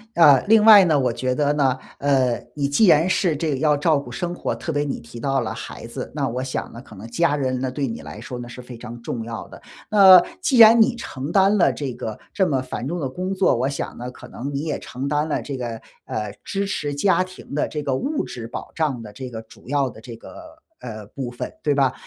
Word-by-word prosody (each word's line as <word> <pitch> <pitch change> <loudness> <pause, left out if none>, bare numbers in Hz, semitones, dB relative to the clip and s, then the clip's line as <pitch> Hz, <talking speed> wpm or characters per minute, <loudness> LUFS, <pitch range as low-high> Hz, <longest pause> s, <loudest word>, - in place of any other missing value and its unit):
呃， 145 -6 +6
另 220 0 +6
外 210 -3 +9
呢， 160 -4 +3
我 125 -2 +1
觉 130 +2 -2
得 145 0 +2
呢， 135 -3 +2 0.2
呃， 130 -5 +2
你 140 -1 0
既 145 +10 +3
然 165 +1 +5
是 185 -3 +1
这 150 -2 -1
要 150 +2 +3
照 150 +1 +2
顾 125 -3 -9
生 175 +8 -3
活， - - -3
特 165 - -5
别 145 -1 0
你 145 - -3
提 120 - -11
到 135 +1 0
了 115 - -3
孩 - - -8
子， - - -7
那 - - 0
我 125 +2 -3
想 130 - -4
呢 115 - -10
可 110 - -14
能 100 +4 -9
家 150 +5 +1
人 130 -3 -1
呢 130 0 -2
对 135 +1 -2
你 115 - -5
来 - - -9
说 125 +1 -7
呢 120 - -7
是 120 +1 -9
非 125 -1 -10
常 115 +1 -9
重 115 0 -4
要 115 -1 -7
的。 - - -13 0.3
那 190 -4 +9 0.2
既 275 -8 +2
然 225 0 +9
你 235 +2 +3
承 145 - -6
担 195 +3 +4
了 180 - +4
这 140 -4 -4
个 110 -2 -6 0.2
这 190 -2 +2
么 135 -5 0
繁 130 -1 -5
重 175 +4 -3
的 135 -5 -2
工 185 +8 -3
作， 190 -7 +3
我 125 +3 0
想 140 - -5
呢 125 +1 -6
可 - - -13
能 140 +4 -6
你 140 - -2
也 155 -1 -3
承 130 +3 -6
担 150 +1 0
了 155 - -1
这 140 -2 -5
个， 120 -3 -5 0.2
呃， 105 -1 -4
支 200 0 -2
持 150 -7 -3
家 185 +5 +3
庭 185 -5 -12
的 150 - 0
这 150 -1 -5
个 135 -2 0
物 285 - -1
质 115 -2 -7
保 - - -7
障 150 -7 -1
的 105 -2 -9
这 130 +1 -7
个 110 -2 -7
主 110 - -18
要 140 -1 +1
的 110 - -13
这 115 +1 -9
个 315 - -13 0.2
呃， 110 -3 -8
部 130 +3 -6
分 120 - -6
对 145 -2 +1
吧？ 135 -2 +2
140 Hz, 270 characters per minute, -22 LUFS, 125-170 Hz, 0.3 s, 外